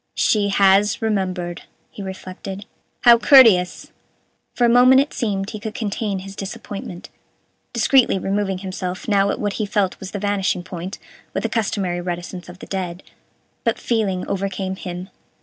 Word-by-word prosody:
"She 205 -2 +2
has 195 +1 +4
remembered," 185 -5 -2 0.3
he - - -9
reflected; 190 +1 -7 0.4
"how 235 -1 +7
courteous!" 210 -8 +5 0.6
For 245 - +3
a - - +5
moment 250 +2 +6
it 280 +2 0
seemed 200 -4 -2
he 215 - -6
could 215 +1 -6
contain 205 -2 -2
his 195 0 -9
disappointment, 195 -2 -7 0.6
discreetly 240 -1 +3
removing 195 0 -1
himself 185 -1 -5
now 200 -2 +3
at - - -2
what 205 -1 -1
he - - 0
felt 195 -2 0
was 190 - -7
the 205 - -5
vanishing 200 -3 0
point, 185 +1 -6 0.4
with - - -1
the - - 0
customary 195 -6 -1
reticence 175 0 -5
of 175 - -10
the - - -10
dead, 185 -2 -4 0.6
but - - +1
feeling 205 -6 -1
overcame 195 -1 -2
him. 180 0 -7
195 Hz, 155 wpm, -21 LUFS, 185-210 Hz, 0.6 s, how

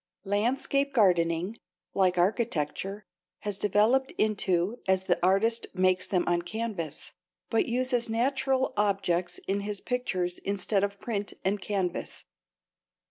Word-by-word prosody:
Landscape 265 +7 +1
gardening, 180 -1 +2 0.4
like 185 -2 +2
architecture, 195 0 -1 0.4
has 205 -2 -3
developed 215 +7 +2
intoll 200 0 +1
as 190 0 +3
the 175 -2 0
artist 220 +5 +2
makes 185 0 +2
them 180 -3 +1
on 175 0 +2
canvas, 185 -4 -5 0.4
but 225 - +2
uses 245 -1 +1
natural 265 +3 +1
objects 195 -4 0
in 195 +1 +1
his 205 0 -3
pictures 185 -9 -1
instead 200 0 0
of 200 0 -2
paint 205 -4 -3
and 195 +1 +1
canvas. 190 -4 -3
200 Hz, 120 wpm, -28 LUFS, 185-230 Hz, 0.4 s, as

